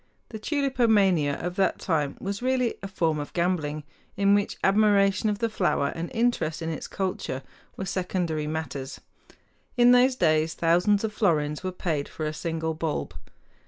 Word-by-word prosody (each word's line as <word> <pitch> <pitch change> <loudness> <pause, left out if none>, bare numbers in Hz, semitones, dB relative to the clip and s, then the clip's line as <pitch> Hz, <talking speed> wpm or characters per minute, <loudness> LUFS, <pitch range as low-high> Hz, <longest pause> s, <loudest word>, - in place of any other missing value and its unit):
The 220 - -7
tulipomania 215 - +2
of 175 +1 -4
that 195 - +2
time 150 -5 -1
was 200 +2 -4
really 255 -1 +1
a 195 - -5
form 165 -5 0
of 145 - -6
gambling, 160 -4 -1 0.3
in 200 0 +4
which 205 +1 +1
admiration 200 0 +3
of 205 - -1
the 230 - 0
flower 180 -9 0
and 165 +1 -5
interest 225 -9 0
in 160 - -2
its 160 - -5
culture 180 -8 -3 0.3
were 190 - -4
secondary 180 -5 -2
matters. 150 -4 -5 0.8
In 245 0 +6
those 250 +1 +5
days 155 -5 +2
thousands 180 +5 +2
of 220 -1 -2
florins 150 -7 0
were 185 - -2
paid 160 -5 -2
for 155 - -5
a 155 - -2
single 160 0 -3
bulb. 160 -1 -3
180 Hz, 160 wpm, -26 LUFS, 155-205 Hz, 0.8 s, In